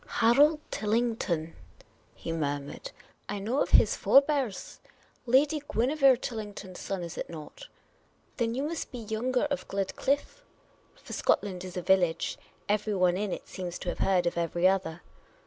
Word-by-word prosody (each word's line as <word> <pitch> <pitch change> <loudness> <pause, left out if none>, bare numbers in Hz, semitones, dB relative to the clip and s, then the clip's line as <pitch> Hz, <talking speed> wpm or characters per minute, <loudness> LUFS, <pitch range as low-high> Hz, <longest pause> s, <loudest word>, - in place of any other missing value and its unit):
" - - -26 0.2
Harold 290 +7 +5
Tillington? 210 -7 -1 0.3
" - - -35
he - - -6
murmured. 145 - -3 0.2
" - - -38
I 205 - -2
know 225 +8 -1
of - - 0
his - - +5
forbears. 275 -7 +2 0.5
Lady 285 +5 +3
Guinevere 265 +2 +4
Tillington' 210 -5 -6
s 180 - -10
son, 190 -3 -3
is 170 - -6
it - - -5
not? 165 - -10 0.7
Then 230 -1 0
you 270 - -1
must 325 +2 -4
be 250 - -6
Younger 235 +3 -1
of 280 - -2
GledclifFe." 275 - -1 0.5
For - - -11
Scotland 185 -3 0
is 185 -1 -7
a 180 - -3
village; 175 -3 +2 0.3
everyone 200 -4 +2
in 200 +1 -2
it - - -5
seems 180 -2 -5
to 180 - -4
have - - -5
heard 185 -2 +2
of 170 0 0
every 170 +2 +2
other. 180 -3 -1
205 Hz, 165 wpm, -29 LUFS, 180-255 Hz, 0.7 s, Harold